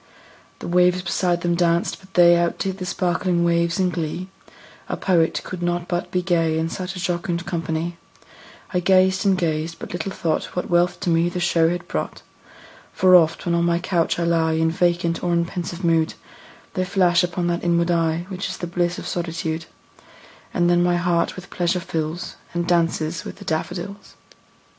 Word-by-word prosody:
The - - -7
waves 180 +1 +3
beside 175 -1 0
them 175 0 +1
danced; 170 +3 +1
but 190 0 -20
they 175 -1 +7
Outdid 185 +3 -1
the 185 - -4
sparkling 175 0 0
waves 170 +2 +1
in 185 -1 +2
glee; 170 +2 -4 0.6
A - - -2
poet 170 -4 +2
could 180 -1 -7
not 175 0 -1
but 175 -1 -2
be 180 0 -1
gay, 165 -3 +1
In 160 0 -1
such 185 +2 -5
a - - -5
jocund 175 -1 -2
company; 165 -1 -3 0.8
I 180 - +2
gazed 190 +1 +3
and 190 -1 +4
gazed 165 -1 -1
but - - -8
little 175 +2 -3
thought 160 -4 -2
What 180 - -3
wealth 175 +1 +2
to 175 - 0
me 165 +1 +3
the 180 - -4
show 165 -2 +3
had 175 0 -4
brought: 75 - -4 0.7
For 185 0 +5
oft, 165 -2 +4
when 170 - +1
on 170 0 +2
my 170 0 +2
couch 175 -1 0
I 170 - 0
lie 165 -1 +2
In 160 0 +2
vacant 170 0 0
or 175 -1 +1
in 170 0 +2
pensive 175 0 -5
mood, 165 -1 +2 0.6
They 185 - 0
flash 185 -1 +3
upon 175 0 -1
that 170 0 -1
inward 170 0 +2
eye 165 0 +1
Which 190 0 -4
is - - -5
the - - -4
bliss 175 0 -1
of - - -7
solitude; 165 -1 -3 0.9
And 175 -1 +1
then 175 0 +4
my 175 0 +2
heart 175 -1 +1
with 185 0 -10
pleasure 175 +1 0
fills, 165 0 -4 0.2
And 175 0 -1
dances 165 -1 +1
with - - -7
the 200 - -12
daffodils. 185 +5 -4
175 Hz, 190 wpm, -22 LUFS, 170-180 Hz, 0.9 s, they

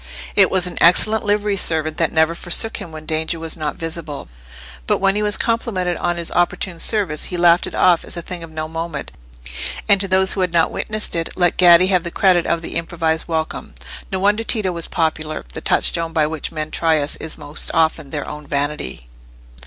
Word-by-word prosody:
It - - +5
was 185 -2 +4
an 180 - 0
excellent 215 +6 +4
livery 205 0 +1
servant 155 -4 0
that 165 -2 +1
never 160 +1 +2
forsook 175 +6 +1
him 165 - -8
when 155 0 -9
danger 160 +1 -1
was 160 -1 -3
not 155 -2 -4
visible. 165 - -6 0.6
But - - +2
when 195 0 +1
he 210 - 0
was 210 -1 +2
complimented 205 -6 -1
on 175 0 -1
his 170 -1 -2
opportune 175 0 -1
service, 190 -9 +1
he 180 - -3
laughed 170 0 +4
it - - -7
off 175 -2 +3
as - - -4
a 170 - -4
thing 180 0 -7
of 165 - -9
no 155 0 -5
moment, 165 -2 -5 0.8
and 200 -2 +5
to 195 - +1
those 190 0 +3
who 195 - -2
had 180 -2 0
not 165 -1 +2
witnessed 215 -3 0
it, 165 -1 -2
let 175 -2 +2
Gaddi 175 0 +6
have 180 -3 +2
the 170 - -4
credit 180 -1 +2
of 170 0 -1
the - - -3
improvised 165 -1 -2
welcome. 160 -1 -4 0.4
No 190 - -1
wonder 205 +4 +1
Tito 215 -5 0
was 170 -1 -3
popular: 155 -3 -2
the - - -5
touchstone 165 -1 +1
by 155 -2 +2
which 155 -1 -5
men 155 -1 -5
try 160 -2 +1
us 145 0 -2
is 160 - -4
most 150 0 -2
often 160 -3 0
their 145 -1 -5
own 150 -1 -8
vanity. 140 - -3
170 Hz, 210 wpm, -19 LUFS, 160-185 Hz, 0.8 s, Gaddi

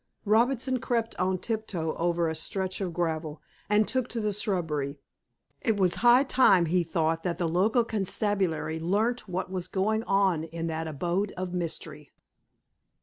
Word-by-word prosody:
Robinson 245 +4 +2
crept 230 -1 -1
on 185 0 +1
tiptoe 190 -7 -3
over 170 0 +1
a 160 - -1
stretch 185 +4 -3
of 185 -3 -2
gravel, 160 -2 -2 0.3
and 210 0 +3
took 255 -2 0
to 235 - -3
the 210 -1 -1
shrubbery. 160 -9 -2 0.6
It 225 -5 +1
was 185 -3 +3
high 245 +2 +7
time, 200 -10 +4
he 175 +2 +2
thought, 165 0 0
that 170 -2 -2
the 175 -2 0
local 200 +9 +2
constabulary 195 -6 -1
learnt 210 +8 0
what 185 +1 -3
was 185 -2 -3
going 205 +4 0
on 190 -5 +2
in 165 0 -5
that 160 0 -3
abode 175 +6 -1
of 180 -1 -4
mystery. 160 -4 -4
185 Hz, 155 wpm, -28 LUFS, 165-215 Hz, 0.6 s, high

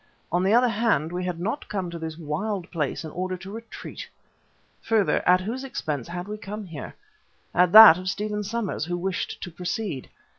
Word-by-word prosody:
On 175 - +2
the 190 +2 +2
other 245 +3 +5
hand, 220 -8 +1
we 180 +1 -3
had 180 -2 -3
not 220 +11 -3
come 190 -4 -3
to 170 - -6
this 160 -1 -6
wild 175 +5 -3
place 160 -1 -2
in 155 - -7
order 185 +2 -3
to 190 +2 -10
retreat. 225 +1 -8 0.7
Further, 220 -4 +2
at 180 0 +6
whose 235 +7 -4
expense 150 - -4
had 175 +2 -5
we 210 0 -6
come 210 +1 -6
here? 160 -6 -8 0.6
At 180 0 +4
that 215 -6 +11
of 185 0 -3
Stephen 210 +1 -2
Somers 210 -5 -2
who 175 +1 -2
wished 185 +1 -3
to 180 - -6
proceed. 180 - -4
185 Hz, 190 wpm, -25 LUFS, 170-215 Hz, 0.7 s, that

